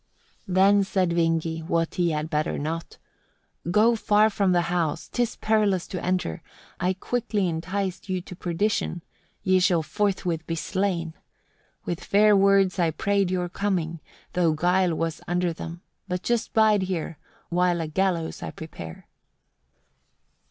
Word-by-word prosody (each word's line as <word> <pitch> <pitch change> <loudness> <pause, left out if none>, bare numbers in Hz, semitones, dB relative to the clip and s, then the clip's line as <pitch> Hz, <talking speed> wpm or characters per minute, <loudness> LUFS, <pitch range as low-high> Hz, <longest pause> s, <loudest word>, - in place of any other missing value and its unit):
37. 185 - -4
Then 200 +1 +5
said 190 -2 +1
Vingi, 165 -1 0
what 165 -1 0
he 175 -2 +1
had 155 -1 -1
better 155 0 0
not, 160 +3 -4 0.7
"Go 220 +6 +4
far 215 0 +3
from 200 -2 +1
the 175 -1 +3
house, 165 -4 -1
'tis 240 -2 -1
perilous 210 -4 +1
to 180 -3 -5
enter; 180 - -1 0.4
I 180 +1 +1
quickly 210 0 -1
enticed 180 +3 -3
you 185 -1 0
to 180 +1 -10
perdition; 175 0 -1 0.4
ye 185 -1 +4
shall 180 -3 +3
forthwith 180 -3 -1
be 165 - -1
slain. 175 -2 -1 0.7
With 175 - -3
fair 210 +1 +5
words 195 -1 +4
I 170 -2 +3
prayed 200 +3 0
your 180 -1 -1
coming, 175 -3 -2 0.3
though 170 -3 +2
guile 180 +2 +2
was 165 0 -2
under 175 0 0
them. 170 +1 -8 0.3
But 180 0 -3
just 235 -1 0
bide 215 -2 +4
here, 175 -4 -3 0.3
while 175 0 +2
a 165 - -1
gallows 170 0 -1
I - - -4
prepare." 85 - -9
180 Hz, 145 wpm, -25 LUFS, 165-195 Hz, 0.7 s, Then